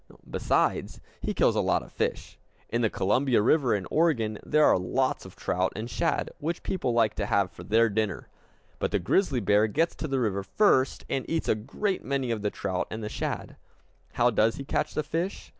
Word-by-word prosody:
Besides, - - 0 0.2
he - - -2
kills - - +3
a - - +2
lot - - +1
of - - -15
fish. - - -3 0.3
In 115 - 0
the 110 - +2
Columbia 120 +7 +2
River 125 -3 +3
in 95 -2 -3
Oregon 120 -10 +1
there 150 0 +3
are - - +5
lots 130 +8 -1
of - - -15
trout 90 +1 -1
and 110 +3 -4
shad, 165 +6 -1
which 165 +3 -3
people 175 -10 -1
like 115 -2 +2
to 100 - -1
have 100 -3 +1
for 85 - -11
their 115 +5 +3
dinner. 110 -1 -2 0.5
But - - 0
the 100 - +1
grizzly 125 - +1
bear 105 +2 +3
gets 160 +10 +1
to 155 - -3
the 135 -2 0
river 100 -5 0
first, 130 - +2
and 135 - -1
eats 165 0 -1
a - - +4
great 140 - -3
many 135 -3 -1
of 110 -2 -2
the 105 - 0
trout 90 -2 -3
and 110 0 -5
the 105 - -3
shad. - - -4 0.6
How 120 +1 +3
does 110 +1 +2
he 140 - -6
catch 150 - -1
the 155 - 0
fish? 165 +6 -3
115 Hz, 210 wpm, -27 LUFS, 105-145 Hz, 0.6 s, are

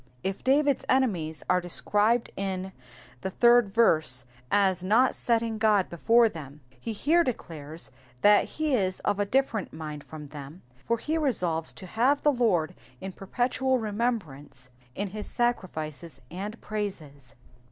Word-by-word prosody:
If 190 0 -3
David^s 280 +1 +3
enemies 180 -13 +1
are 180 0 +3
described 210 +6 +2
in 190 -1 -3 0.5
the 190 - -2
third 235 0 +4
verse 155 - +2 0.2
as 190 -3 +2
not 225 +7 +4
setting 230 -2 0
God 210 -4 +3
before 230 +7 +4
them, 150 -6 -9 0.2
he 230 - -5
here 310 +11 +3
declares 160 - -6 0.3
that 205 0 +6
he 310 -2 0
is 185 -6 +1
of 205 0 0
a 205 - 0
different 240 -3 0
mind 155 -2 -7
from 150 -2 -10
them, 150 +3 -10
for 230 - -2
he 315 +7 -2
resolves 175 - 0
to 190 - -10
have 250 +9 +1
the 295 - +4
Lord 200 -11 +1 0.3
in 190 - -6
perpetual 250 +7 0
remembrance 200 - -3 0.2
in 200 0 -2
his 210 +2 -6
sacrifices 165 - -3
and 205 +6 -6
praises. 155 - -6
200 Hz, 140 wpm, -27 LUFS, 160-235 Hz, 0.5 s, that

